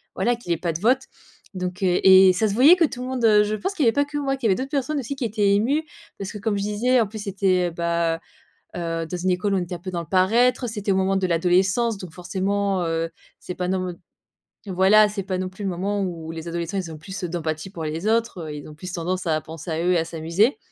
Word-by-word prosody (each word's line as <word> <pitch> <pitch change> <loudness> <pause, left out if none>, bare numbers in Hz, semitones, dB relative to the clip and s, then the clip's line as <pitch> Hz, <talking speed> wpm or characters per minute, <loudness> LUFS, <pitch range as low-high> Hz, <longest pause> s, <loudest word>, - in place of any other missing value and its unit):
voilà 245 - +1
qu'il 230 -7 -7
ait - - -2
pas 170 0 -2
de 160 - -5
vote» 255 +5 +3 0.5
donc, 180 0 -4
heu. 180 -1 +2
Et 190 0 +8
ça 215 +4 +1
se - - -2
voyait 275 - +7
que 355 - +2
tout 265 -5 -1
le - - -5
monde, 255 -2 -3
heu 210 -1 +6
je 210 +1 -1
pense 380 - -3
qu'il 310 -8 0
y - - +5
avait 225 - +4
pas 285 0 +2
que 290 +1 -5
moi, 275 -2 0
qu'il 265 -4 -1
y - - +2
avait 190 - +4
d'autres 260 +5 -4
personnes 290 +1 -1
aussi 275 +2 -4
qui 270 - -5
étaient 210 -3 +2
émues 270 +10 +1 0.3
parce 195 -1 -5
que, - - -6
comme 205 0 -1
je 200 - -2
disais, 230 +5 +2
en 225 - +2
plus, 215 +2 -8
c'était, 190 -2 +1
heu, - - -10
bah, 170 0 0 0.6
heu, 165 -1 -3
dans 180 - -4
une 185 - +1
école 185 +3 0
où - - +2
on - - 0
était 175 0 -4
un - - -11
peu 185 +2 -7
dans 175 - -2
le 170 - -7
paraître, 235 +7 +3
c'était 210 -2 -3
au 190 - +3
moment 190 0 +1
de 190 -1 0
l'adolescence, 185 +7 +2
donc 185 -3 -9
forcément, 190 +2 -1
heu, 165 0 -1 0.3
c'est 180 - -7
pas 180 0 -3
nom 185 -1 -1 0.7
voilà 195 +3 +5
c'est 205 -1 -4
pas 185 -1 -3
non 185 0 -2
plus 185 +3 -11
le 195 - 0
moment 200 +3 -2
où 165 -4 -5
les 165 0 -7
adolescents 170 +3 -3
ils 180 -3 -4
ont - - -7
le - - -10
plus, 190 +5 -7
heu, - - -2
d'empathie 160 0 -4
pour 170 -4 -7
les 160 +5 -4
autres, 225 -4 0
heu, 150 - -6
ils 145 0 -8
ont 155 - -11
plus 180 +3 -7
tendance 180 +1 -3
à 155 -2 +1
penser 160 +2 -9
à 160 +1 -1
eux 180 - +3
et - - +3
à 165 - +1
s'amuser. 170 - +1
190 Hz, 285 wpm, -23 LUFS, 175-220 Hz, 0.7 s, Et